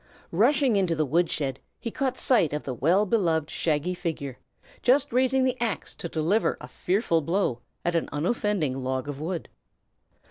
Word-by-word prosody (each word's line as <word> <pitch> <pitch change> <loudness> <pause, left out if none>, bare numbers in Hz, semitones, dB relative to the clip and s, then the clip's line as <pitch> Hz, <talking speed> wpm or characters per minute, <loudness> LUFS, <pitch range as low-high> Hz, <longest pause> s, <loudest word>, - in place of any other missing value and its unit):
Rushing 245 - +3
into 180 -4 +2
the 155 -1 +1
wood 165 +5 +2
shed, 135 -3 -2 0.2
he 230 - -4
caught 265 0 -1
sight 200 - +3
of 150 - -2
the 130 - -3
well 170 - +3
beloved 165 -8 +1
shaggy 160 +2 0
figure, 160 -7 -4 0.4
just 270 +1 +3
raising 260 +1 +3
the 255 -1 0
axe 225 -4 -2
to 170 - -5
deliver 165 +8 +1
a - - -9
fearful 180 -3 +1
blow 165 -6 0 0.3
at 175 0 +1
an 165 - 0
unoffending 175 - 0
log 130 +1 -2
of 145 0 -5
wood. 170 +1 -3
175 Hz, 170 wpm, -26 LUFS, 150-225 Hz, 0.4 s, Rushing